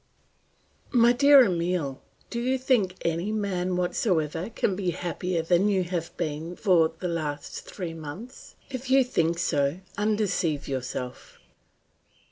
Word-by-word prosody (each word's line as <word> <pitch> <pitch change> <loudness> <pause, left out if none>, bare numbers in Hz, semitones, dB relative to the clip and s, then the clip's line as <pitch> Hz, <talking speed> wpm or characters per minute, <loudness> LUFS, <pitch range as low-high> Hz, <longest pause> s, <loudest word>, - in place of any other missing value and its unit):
"My 240 -1 +5
dear 280 +1 +7
Emile, 170 - -1 0.3
do 235 - -2
you 255 +2 +1
think 240 -8 +1
any 170 +5 0
man 185 -4 -1
whatsoever 175 -2 0
can 210 -4 0
be 185 -2 -1
happier 175 0 -2
than 175 +4 +3
you 190 -2 +2
have 170 -2 -4
been 160 +1 -3
for 170 -6 +3
the 180 - -3
last 155 -4 -4
three 175 -4 -6
months? 165 - -9 0.2
If 255 0 -5
you 265 0 +6
think 170 -9 0
so, 145 -3 +1 0.2
undeceive 205 -8 0
yourself. 125 -1 -5
180 Hz, 130 wpm, -26 LUFS, 165-215 Hz, 0.3 s, dear